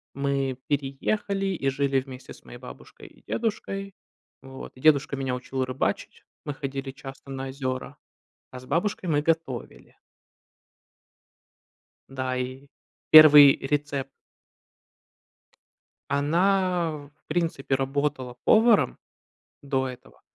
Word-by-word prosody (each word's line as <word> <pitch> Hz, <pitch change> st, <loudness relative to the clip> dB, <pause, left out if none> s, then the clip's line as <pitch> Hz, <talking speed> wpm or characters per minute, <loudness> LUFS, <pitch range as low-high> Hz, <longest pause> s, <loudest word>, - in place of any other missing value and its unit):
мы 140 Hz, -2 st, -1 dB
переехали 195 Hz, +9 st, -1 dB
и 160 Hz, -8 st, -1 dB
жили 135 Hz, 0 st, +1 dB
вместе 130 Hz, -1 st, -11 dB
с -, -, -19 dB
моей 120 Hz, -, -11 dB
бабушкой 125 Hz, -, -13 dB
и -, -, -21 dB
дедушкой. 195 Hz, -3 st, -3 dB, 0.5 s
Вот, 135 Hz, 0 st, -11 dB
и 130 Hz, -, -14 dB
дедушка 150 Hz, -2 st, +3 dB
меня 130 Hz, -2 st, -2 dB
учил 130 Hz, +1 st, -3 dB
рыбачить, 130 Hz, +1 st, -3 dB, 0.2 s
мы 145 Hz, -, -3 dB
ходили 135 Hz, -1 st, -5 dB
часто 135 Hz, 0 st, -11 dB
на 135 Hz, 0 st, -5 dB
озера, 130 Hz, -1 st, -5 dB, 0.5 s
а 130 Hz, -, -8 dB
с 130 Hz, -, -14 dB
бабушкой 180 Hz, +3 st, -1 dB
мы 145 Hz, -1 st, +2 dB
готовили. 160 Hz, -6 st, -3 dB, 2.1 s
Да, 130 Hz, -1 st, -3 dB
и 130 Hz, +2 st, -5 dB, 0.4 s
1 150 Hz, -3 st, +10 dB
рецепт. 140 Hz, -1 st, -2 dB, 2.0 s
Она, 175 Hz, +4 st, +1 dB
в 145 Hz, -2 st, -9 dB, 0.2 s
принципе, 155 Hz, -5 st, -1 dB
работала 135 Hz, -2 st, -2 dB
поваром 225 Hz, 0 st, +4 dB, 0.7 s
до 135 Hz, -2 st, -1 dB
этого, 125 Hz, -1 st, -12 dB
140 Hz, 110 wpm, -25 LUFS, 130-160 Hz, 2.1 s, 1